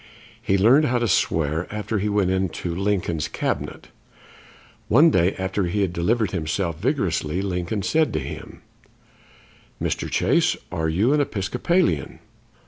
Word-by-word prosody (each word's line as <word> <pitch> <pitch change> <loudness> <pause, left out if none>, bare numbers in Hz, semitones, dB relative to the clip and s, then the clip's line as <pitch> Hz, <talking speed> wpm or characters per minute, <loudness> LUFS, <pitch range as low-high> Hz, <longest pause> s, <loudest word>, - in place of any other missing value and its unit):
He 95 - +1
learned 125 +10 +5
how 125 -3 +1
to 120 -1 0
swear 80 -2 0
after 105 0 -2
he 105 +2 -1
went 100 -3 +1
into 95 -2 -2
Lincoln's 90 -4 -1
Cabinet. - - -4 1.0
One 150 +9 +6
day, 90 -3 +2
after 95 +1 -1
he 90 +4 -1
had 95 -3 0
delivered 105 +4 0
himself 85 -1 -2
vigorously, 95 - -1
Lincoln 95 +2 -2
said 160 +6 +2
to 80 - 0
him: 70 0 -8 1.2
"Mr. - - -2
Chase, - - +2
are 80 0 -1
you 105 - +2
an 150 - +3
Episcopalian?" 120 - 0
95 Hz, 135 wpm, -23 LUFS, 85-110 Hz, 1.2 s, One